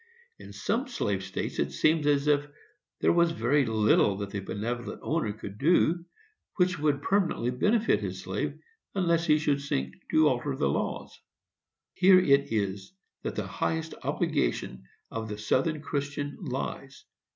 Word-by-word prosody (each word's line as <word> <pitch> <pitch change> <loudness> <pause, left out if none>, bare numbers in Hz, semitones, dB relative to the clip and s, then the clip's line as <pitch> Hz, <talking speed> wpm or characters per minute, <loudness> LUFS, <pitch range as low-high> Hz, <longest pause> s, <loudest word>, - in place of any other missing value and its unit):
In - - -11
some 255 +5 -1
slave 100 - -2
states 95 0 -4
it - - 0
seems 155 -1 +2
as 145 -1 +3
if 145 -1 +2 0.5
there - - +4
was 170 -1 +3
very 135 +1 +2
little 105 -2 +3
that 100 -1 -5
the 100 - -3
benevolent 115 +5 -4
owner 155 -9 0
could 105 -1 -9
do 170 +2 +3 0.5
which 180 -1 +2
should 145 -2 0
permanently 180 - +1
benefit 210 - +2
his - - -4
slave, - - -3 0.4
unless 170 -3 +1
he 150 -1 +5
should 145 -2 0
seek 65 - -2 0.2
to 155 -1 +5
alter 130 0 0
the 70 - +1
laws. 70 - -3 0.7
Here 185 +1 +6
it 140 -7 +3
is 100 - -2 0.3
that - - -4
the - - -2
highest 160 0 -2
obligation 60 +1 -1 0.3
of 110 -1 -4
the 105 - -5
Southern 145 +8 0
Christian 145 -1 -3
lies. 135 -2 -5
140 Hz, 150 wpm, -28 LUFS, 110-165 Hz, 0.7 s, Here